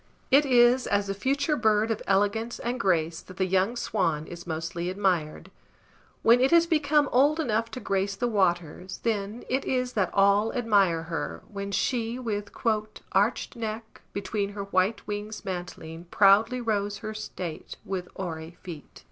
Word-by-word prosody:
It 285 Hz, +2 st, +6 dB
is 245 Hz, 0 st, +5 dB
as 200 Hz, 0 st, +1 dB
the 195 Hz, -, -2 dB
future 275 Hz, -, 0 dB
bird 220 Hz, -2 st, +2 dB
of 220 Hz, -, -2 dB
elegance 205 Hz, +4 st, +1 dB
and 245 Hz, +1 st, -3 dB
grace 165 Hz, -5 st, +1 dB
that 185 Hz, -, -14 dB
the 190 Hz, -, +1 dB
young 190 Hz, +5 st, +1 dB
swan 165 Hz, -10 st, -1 dB
is 175 Hz, +1 st, -10 dB
mostly 165 Hz, +2 st, -3 dB
admired; 185 Hz, -5 st, -1 dB, 0.7 s
when 235 Hz, +2 st, +6 dB
it 260 Hz, -, +4 dB
has 335 Hz, +1 st, +5 dB
become 300 Hz, -3 st, +2 dB
old 290 Hz, +5 st, +4 dB
enough 230 Hz, -6 st, 0 dB
to 230 Hz, -, -7 dB
grace 195 Hz, -2 st, -1 dB
the 245 Hz, -, -1 dB
waters, 185 Hz, -3 st, -1 dB
then 215 Hz, 0 st, -2 dB
it 260 Hz, +2 st, 0 dB
is 250 Hz, -1 st, -1 dB
that 200 Hz, -5 st, +1 dB
all 200 Hz, +2 st, +3 dB
admire 200 Hz, -9 st, +2 dB
her, 165 Hz, 0 st, -4 dB
when 200 Hz, -1 st, -5 dB
she 235 Hz, +2 st, -1 dB
with 210 Hz, -5 st, -4 dB
"Archèd 215 Hz, -1 st, -1 dB
neck, 225 Hz, -1 st, -6 dB
Between 200 Hz, 0 st, -3 dB
her 200 Hz, -1 st, -4 dB
white 195 Hz, +2 st, 0 dB
wings 210 Hz, +1 st, -5 dB
mantling, 175 Hz, -2 st, -6 dB
proudly 205 Hz, +7 st, +4 dB
rows 205 Hz, -3 st, -1 dB
Her 215 Hz, -, -4 dB
state 180 Hz, -6 st, -6 dB
with 185 Hz, -2 st, -4 dB
oary 165 Hz, -2 st, -6 dB
feet." 165 Hz, -6 st, -10 dB
205 Hz, 160 wpm, -27 LUFS, 185-235 Hz, 0.7 s, It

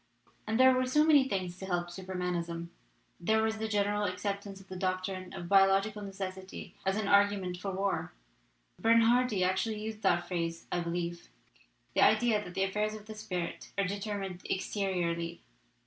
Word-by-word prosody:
"And 220 Hz, +2 st, 0 dB
there 260 Hz, 0 st, +8 dB
were 255 Hz, 0 st, +1 dB
so 300 Hz, +4 st, +4 dB
many 285 Hz, -4 st, +5 dB
things 185 Hz, -3 st, -2 dB
to 190 Hz, -, -6 dB
help 175 Hz, -1 st, -1 dB
Super 190 Hz, +1 st, -7 dB
manism! 170 Hz, -2 st, -2 dB, 0.5 s
There 220 Hz, +5 st, +2 dB
was 220 Hz, 0 st, 0 dB
the 220 Hz, -, -1 dB
general 205 Hz, -1 st, +1 dB
acceptance 200 Hz, +1 st, -3 dB
of 195 Hz, -, -16 dB
the 185 Hz, -, -7 dB
doctrine 185 Hz, 0 st, -2 dB
of 175 Hz, -, -6 dB
biological 195 Hz, +2 st, +4 dB
necessity 190 Hz, -1 st, -6 dB
as 190 Hz, +2 st, +2 dB
an 215 Hz, -, -1 dB
argu 200 Hz, 0 st, +4 dB
ment 180 Hz, -1 st, -4 dB
for 195 Hz, +2 st, -4 dB
war 190 Hz, -, -1 dB, 0.7 s
Bernhardi 230 Hz, -1 st, +4 dB
actually 190 Hz, +4 st, 0 dB
used 215 Hz, 0 st, -5 dB
that 175 Hz, -3 st, +2 dB
phrase, 165 Hz, -2 st, -3 dB
I 175 Hz, -, +1 dB
believe 170 Hz, 0 st, -3 dB, 0.6 s
the -, -, +2 dB
idea 225 Hz, -4 st, +4 dB
that 180 Hz, 0 st, -10 dB
affairs 210 Hz, +3 st, 0 dB
of 210 Hz, -1 st, -10 dB
the 215 Hz, -, -8 dB
spirit 180 Hz, -5 st, -5 dB
are 200 Hz, -, +2 dB
determined 200 Hz, -2 st, -4 dB
exteriorly. 175 Hz, -4 st, -1 dB
195 Hz, 165 wpm, -31 LUFS, 180-210 Hz, 0.7 s, there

